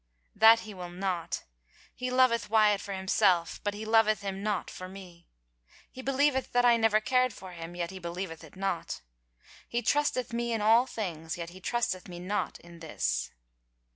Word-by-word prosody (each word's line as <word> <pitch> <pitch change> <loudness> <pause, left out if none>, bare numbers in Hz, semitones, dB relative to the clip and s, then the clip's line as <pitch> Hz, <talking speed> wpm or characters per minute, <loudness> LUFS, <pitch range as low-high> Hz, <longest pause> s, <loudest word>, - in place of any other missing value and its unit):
"That 225 +1 +7
he 215 - -9
will 180 -2 -7
not. 180 -1 -3 0.5
He 255 0 -4
loveth 250 -3 +3
Wyatt 210 -2 +4
for 200 - -6
himself 190 -2 +2
— - - -38
but 205 0 -1
he 215 +1 -6
loveth 215 -1 +4
him 195 -1 -4
not 205 -2 -2
for 185 0 -8
me. 180 -3 -12 0.6
He 260 - -9
believeth 270 0 +1
that 245 0 +4
I 240 -1 +7
never 225 -2 +3
cared 255 +1 +2
for 190 -2 -10
him, 170 0 -8
yet 175 0 -3
he 190 - -8
believeth 170 -1 -5
it - - -14
not. 195 -2 -3 0.7
He 240 0 -1
trusteth 255 -2 +1
me 235 0 -1
in 225 - 0
all 225 +4 +5
things, 170 -7 -4
yet 170 0 -6
he 185 +1 -13
trusteth 215 -5 -1
me 175 -1 -8
not 195 +4 -2
in 170 0 -14
this." 105 - -2
200 Hz, 185 wpm, -29 LUFS, 180-235 Hz, 0.7 s, That